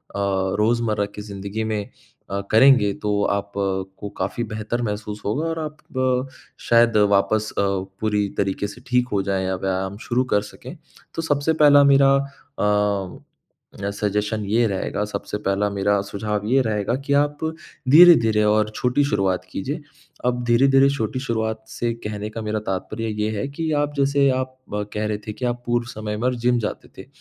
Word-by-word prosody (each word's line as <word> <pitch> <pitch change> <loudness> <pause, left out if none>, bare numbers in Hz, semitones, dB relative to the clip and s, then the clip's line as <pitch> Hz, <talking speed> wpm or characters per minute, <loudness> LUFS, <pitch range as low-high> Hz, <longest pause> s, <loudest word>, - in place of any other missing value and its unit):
रोज़मर्रा 100 +3 +1
की 105 - -6
ज़िंदगी 100 +1 -5
में 110 -2 -2 0.5
अ, 100 0 -1
करेंगे 110 -3 +6
तो 105 0 +1
आप 100 0 -6
को 95 +1 -3
काफ़ी 100 +5 -2
बेहतर 110 +3 -3
महसूस 105 -1 -4
होगा 140 +11 -1
और 165 0 -3
आप 150 0 -8 0.9
शायद 115 -1 +5 0.2
वापस 110 +2 +2
अ, - - +3
पूरी 100 +2 -1
तरीक़े 100 +1 -1
से 120 +4 -11
ठीक 125 0 +2
हो 100 - +2
जाएँ 95 -1 -1
या 95 0 -1
व्यायाम 95 +1 -2
शुरू 125 +1 +2
कर 105 - +4
सकें। - - -10 0.4
तो 165 - -1
सबसे 150 0 +1
पहला 145 -1 +7
मेरा 135 0 +5 0.5
अ, 105 -2 0 0.7
सजेशन 105 +1 -1
ये 115 +4 +2
रहेगा, 100 +1 -2
सबसे 105 0 -5
पहला 100 +1 +1
मेरा 100 0 +1
सुझाव 105 +1 -3
ये 135 +3 +4
रहेगा 105 0 -1
कि 140 - +1
आप 145 +1 +2 0.5
धीरे-धीरे 130 -9 +7
और 105 0 +2
छोटी 125 +3 +1
शुरुआत 95 -7 0
कीजिए। 145 - -4 0.4
अब 125 0 0
धीर-धीरे 135 +3 +5
छोटी 130 -2 -2
शुरुआत 110 -3 -2
से 115 +1 -2
कहने 105 0 -4
का 110 +1 -6
मेरा 105 0 -2
तात्पर्य 110 +4 -3
ये 105 - +1
है, 105 - -2
कि 160 +3 -3
आप 145 0 0
जैसे 140 0 +3
आप 130 0 -5 0.4
कह 105 0 -2
रहे 105 -1 -1
थे 105 - -3
कि 125 - -5
आप 120 0 -2
पूर्व 120 0 0
समय 105 -2 -5
में 125 +3 +1
जिम 120 0 +2
जाते 105 - -5
थे। - - -10
110 Hz, 170 wpm, -22 LUFS, 100-125 Hz, 0.9 s, पहला